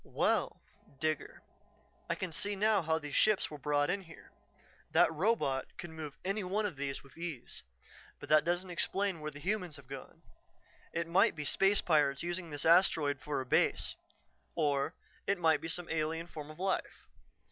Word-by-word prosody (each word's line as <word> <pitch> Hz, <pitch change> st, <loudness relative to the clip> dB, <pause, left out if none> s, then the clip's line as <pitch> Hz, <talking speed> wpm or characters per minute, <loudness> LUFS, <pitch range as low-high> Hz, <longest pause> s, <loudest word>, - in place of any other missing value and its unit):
"Well, -, -, 0 dB, 0.4 s
Digger, 155 Hz, -1 st, -2 dB, 0.7 s
I -, -, +1 dB
can 185 Hz, -2 st, -4 dB
see 205 Hz, +6 st, -1 dB
now 210 Hz, 0 st, +3 dB
how 160 Hz, -1 st, +1 dB
these 150 Hz, -2 st, -7 dB
ships 215 Hz, -6 st, +3 dB
were 150 Hz, -, -7 dB
brought 145 Hz, +2 st, +1 dB
in 200 Hz, +1 st, -1 dB
here; 165 Hz, -3 st, -14 dB, 0.6 s
that -, -, +5 dB
robot 160 Hz, -, +1 dB
could 175 Hz, -2 st, -7 dB
move 155 Hz, -3 st, -7 dB
any 195 Hz, +2 st, 0 dB
one 200 Hz, +4 st, 0 dB
of 190 Hz, -6 st, -2 dB
these 140 Hz, -1 st, -4 dB
with 140 Hz, -, -18 dB
ease. 165 Hz, -8 st, -5 dB, 0.6 s
But -, -, -9 dB
that 155 Hz, 0 st, +6 dB
doesn't 175 Hz, +2 st, -1 dB
explain 190 Hz, +1 st, 0 dB
where 155 Hz, 0 st, -4 dB
the 145 Hz, -, -11 dB
humans 180 Hz, 0 st, -2 dB
have 140 Hz, -2 st, -13 dB
gone. 135 Hz, -1 st, -9 dB, 0.7 s
It 170 Hz, 0 st, -1 dB
might 195 Hz, +7 st, +4 dB
be 150 Hz, -2 st, -4 dB
space 195 Hz, +8 st, +3 dB
pirates 145 Hz, -4 st, +2 dB
using 175 Hz, 0 st, -3 dB
this 145 Hz, -2 st, -3 dB
asteroid 160 Hz, -5 st, +5 dB
for 145 Hz, -1 st, -2 dB
a -, -, -6 dB
base, -, -, +2 dB, 0.6 s
or 145 Hz, 0 st, +1 dB, 0.3 s
it 200 Hz, -, +2 dB
might 160 Hz, -3 st, +3 dB
be -, -, -4 dB
some 170 Hz, +1 st, -3 dB
alien 160 Hz, +1 st, -1 dB
form 155 Hz, -3 st, -8 dB
of 155 Hz, -, -10 dB
life. 190 Hz, +1 st, -2 dB
160 Hz, 180 wpm, -33 LUFS, 150-185 Hz, 0.7 s, that